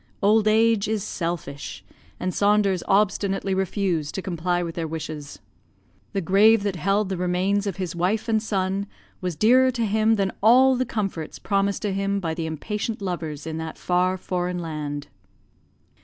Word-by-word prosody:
Old 215 +1 +4
age 220 -1 +3
is 215 -2 -1
selfish, 165 -8 -5 0.4
and 185 0 -2
Saunders 200 -3 +2
obstinately 195 -1 +1
refused 190 -5 -1
to 190 - -2
comply 175 0 -1
with 165 -1 -4
their 165 -2 -3
wishes. 155 -2 -6 0.8
The 195 - 0
grave 200 +4 +5
that 200 -2 -1
held 195 +5 +1
the 190 - -2
remains 185 +3 0
of 195 - -2
his 185 -2 -4
wife 190 +7 0
and 220 -1 +2
son 195 -1 -1 0.3
was 180 -3 -2
dearer 250 +9 +5
to 235 -3 -1
him 220 +1 +3
than 195 -3 0
all 255 +5 +6
the 255 +1 -1
comforts 195 -8 -3
promised 200 0 0
to 205 -2 0
him 195 +1 0
by 165 -4 -2
the 160 0 -3
impatient 210 +8 -3
lovers 165 -6 -4
in 160 -1 -4
that 160 0 -5
far 180 +1 +1
foreign 180 -1 -2
land. 150 -4 -4
190 Hz, 165 wpm, -24 LUFS, 170-210 Hz, 0.8 s, all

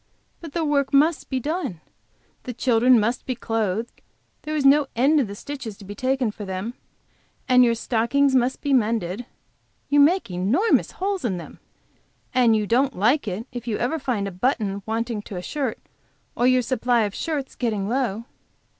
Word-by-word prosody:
But 325 -4 -10
the 330 -2 -1
work 280 -2 +1
must 305 +3 +3
be 260 - -1
done. 290 - -3 0.7
The 250 - -5
children 245 0 +4
must 230 +4 -1
be 255 - -1
clothed, 225 -1 -2 0.4
there 305 0 -4
is 290 -2 0
no 280 +1 +5
end 280 +6 +4
to - - +3
the 200 -1 -8
stitches 245 -4 -7
to 200 - -13
be 205 - -7
taken 255 +1 0
for 210 - -9
them, 190 +4 -4 0.7
and 250 -1 +6
your 235 -1 +3
stockings 250 +5 +1
must 255 0 +1
be 285 -2 0
mended 225 -3 0 0.6
you 290 +1 +4
make 320 - +4
enormous 215 - +1
holes 390 0 -2
in 200 -7 -1
them! 170 - -10 0.7
and 245 -3 +4
you 215 -1 0
don't 255 +4 +1
like 235 +7 +2
it 200 +4 -4
if 245 -1 -7
you 220 - -1
ever 260 +7 -1
find 235 -7 -2
a - - -5
button 200 -1 -1
wanting 225 0 -2
to 205 - -9
a 180 - -5
shirt 270 +1 -3 0.6
or 245 - +2
your 255 -1 +4
supply 245 -1 +1
of 205 -2 -1
shirts 290 -2 -3
getting 215 -5 -1
low." 230 -3 -1
245 Hz, 180 wpm, -23 LUFS, 215-275 Hz, 0.7 s, and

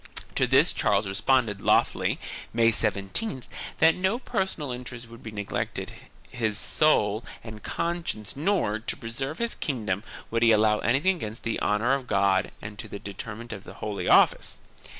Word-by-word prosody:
To - - +2
this - - +5
Charles 100 +1 +2
responded 105 +1 +1
loftily, - - +2 0.4
May 115 0 +5
17th, 110 - -1 0.3
that 160 0 +6
for 180 - -9
no 190 +5 +2
personal 190 - -2
interest 125 -1 -7
would 115 0 -13
he 110 - -6
neglect 105 -1 -3 0.5
his 110 -4 0
soul 110 -9 +2 0.2
and 110 -2 -9
conscience 170 -11 -3
nor, 145 - +1
to 110 - -4
preserve 135 +6 -4
his 235 0 0
kingdom, 105 -8 -2 0.3
would 115 0 +1
he 115 -1 +6
allow 105 0 +4
anything 145 +10 +2
against 110 -6 -6
the 115 - -1
honor 110 +5 +2
of 135 -2 -2
God 100 -2 +2
and 105 0 -8
to 110 - -6
the 100 - -6
detriment 110 +4 -7
of 100 -3 -8
the - - -11
Holy 105 -2 -4
Office. - - +4
115 Hz, 165 wpm, -27 LUFS, 105-135 Hz, 0.5 s, that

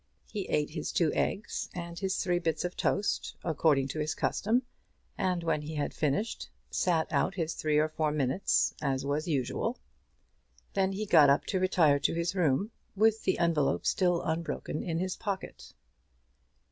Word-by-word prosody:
He 205 -3 -5
ate 150 0 0
his 155 -1 -4
two 165 -4 +2
eggs 205 - -2
and 170 -1 -6
his 190 -1 -1
three 175 -2 +1
bits 165 0 -1
of 180 - -4
toast, 200 +1 0
according 150 -4 +2
to 155 - -4
his 155 +1 -1
custom, 235 +5 +1 0.5
and 180 -2 0
when 165 -2 0
he 155 +1 -6
had 145 -1 -2
finished, 155 +10 -1 0.2
sat 165 -3 +1
out - - +1
his 165 -3 -1
three 155 -1 0
or 155 +1 +4
four 155 -1 -1
minutes 150 +4 +1
as 135 -2 -1
was 145 +4 -1
usual. 155 - -1 1.0
Then 195 -1 +1
he 210 +2 -3
got 155 -7 +6
up 140 - +3
to 190 - -1
retire 170 -6 +4
to 140 - +1
his 170 +1 -1
room, 180 - +1 0.2
with 220 +2 +3
the 185 - +2
envelope 165 -5 +1
still 175 -2 +2
unbroken 160 -1 -3
in 165 -2 -2
his 185 +1 -1
pocket. 200 -4 -5
170 Hz, 170 wpm, -30 LUFS, 150-190 Hz, 1.0 s, got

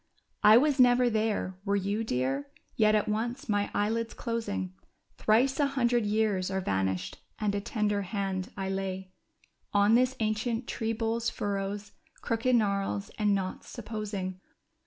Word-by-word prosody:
I 215 +2 +8
was 285 +1 +3
never 245 -1 +5
there; 215 -4 -1
were 200 0 +1
you, 200 +3 0
dear? 135 - -1 0.3
Yet 215 -1 +4
at 215 +1 +1
once, 235 +5 -2
my 205 -2 +1
eyelids 225 +2 -1
closing. 160 - -3 0.5
Thrice 245 +6 +3
a 290 - +4
hundred 240 -5 +1
years 205 -3 +1
are 190 0 -1
vanished, 95 - -1 0.2
and 210 -2 0
a 200 - -1
tender 210 -1 0
hand 195 -1 -3
I 195 -1 -2
lay 190 -1 -3 0.6
On 205 +1 +4
this 255 +2 +4
ancient 225 +2 -1
tree 225 -1 -2
bole's 225 +1 -1
furrows, 205 0 -3 0.3
crooked 235 +2 +1
gnarls 195 - 0
and 210 -1 +3
knots, 190 -1 -4
supposing. 205 -5 -5
210 Hz, 145 wpm, -29 LUFS, 195-230 Hz, 0.6 s, I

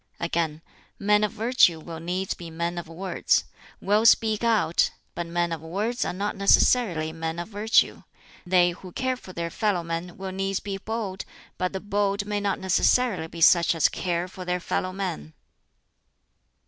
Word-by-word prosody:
Again, 165 -2 -2 0.3
"Men 210 +1 +3
of 210 - +1
virtue 220 -7 +3
will 165 0 -8
needs 180 +3 -2
be 170 -1 -9
men 170 +2 -3
of 170 - -8
words 180 +4 0 0.4
will 210 +3 +2
speak 220 -1 +4
out 220 -7 +3 0.2
but 170 0 -4
men 170 0 -1
of 165 -2 -4
words 205 +9 -2
are - - -1
not 200 +4 -3
necessarily 195 -5 +3
men 160 0 -4
of 175 +3 -5
virtue. 215 +1 +2 0.4
They 180 -1 +3
who 180 +1 -11
care 260 0 -1
for 220 -7 -12
their 170 -1 -4
fellow 205 -5 0
men 170 +1 -5
will 190 0 -5
needs 195 0 -1
be 195 -1 -5
bold, 205 -3 -4 0.4
but 185 0 0
the 190 - -4
bold 200 0 -1
may 205 0 -1
not 200 -1 -1
necessarily 190 -1 +2
be 165 +1 -9
such 170 +1 +5
as 160 - +4
care 175 -1 -2
for 185 0 -9
their 180 0 -1
fellow 185 +1 -2
men." 185 - -5
185 Hz, 175 wpm, -25 LUFS, 170-205 Hz, 0.4 s, such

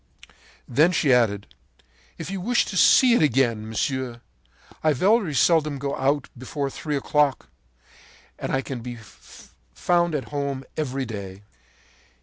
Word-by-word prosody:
“Then 150 +8 +3
she 145 -5 +3
added: 105 -5 +1 0.6
'If - - -6
you 195 -2 -4
wish 240 +6 +1
to - - -6
see 245 +6 +6
it 240 - +3
again, 120 -6 +1
monsieur, 125 +1 -3 0.6
I 155 -1 +3
very 190 - +2
seldom 155 +1 +3
go 140 +1 -3
out 140 +1 0
before 135 +2 -4
three 150 +1 -4
o'clock; 145 -1 0 0.9
and - - -4
I 135 - +1
can 130 -3 -6
be 120 +1 -7
found 115 - -4
at 135 -5 -4
home 140 -2 -3
every 135 -3 -2
day.' 100 -3 -8
135 Hz, 135 wpm, -24 LUFS, 120-155 Hz, 0.9 s, see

